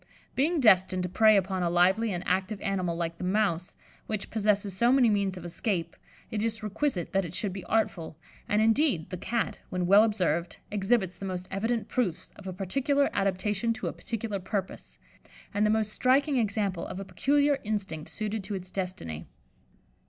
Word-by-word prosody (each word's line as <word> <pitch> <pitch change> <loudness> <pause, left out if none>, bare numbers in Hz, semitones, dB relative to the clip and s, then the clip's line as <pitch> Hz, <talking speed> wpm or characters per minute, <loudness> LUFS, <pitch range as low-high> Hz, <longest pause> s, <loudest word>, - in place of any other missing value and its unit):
Being 315 +5 +1
destined 190 -6 +4
to 180 - -2
prey 215 +3 +5
upon 190 -1 0
a 175 - +1
lively 190 +6 +3
and 175 -2 -4
active 190 +3 0
animal 185 -4 -1
like 170 0 -3
the - - -5
mouse, 180 -3 0 0.3
which 215 -2 -4
possesses 205 -3 +1
so 235 +5 +4
many 255 -4 +5
means 200 -2 0
of 175 - -8
escape, 175 -1 -2 0.4
it 210 -1 -1
is 225 -1 -2
requisite 215 - -1
that 195 0 +2
it 170 0 -6
should 200 -2 -1
be 190 -1 -6
artful; 175 -8 -1 0.3
and, 210 +1 +3
indeed, 225 - +2
the 180 - -3
Cat, 230 +5 -2
when 180 -1 -1
well 200 +4 +7
observed, 175 -6 0
exhibits 195 -2 +1
the 195 - -6
most 185 -1 -4
evident 225 +4 -1
proofs 190 -9 -2
of 200 - -11
a - - -3
particular 275 - 0
adaptation 200 +3 0
to - - -6
a - - -2
particular 220 -3 -4
purpose, 190 0 -5 0.6
and 205 +1 +2
the - - +2
most 215 -1 +1
striking 275 +2 +3
example 200 -5 0
of 185 - -6
a 195 - -6
peculiar 285 +5 +2
instinct 195 -7 -3
suited 215 -1 -3
to 200 +1 -4
its 185 -1 -7
destiny. 180 - -5
200 Hz, 180 wpm, -28 LUFS, 185-220 Hz, 0.6 s, well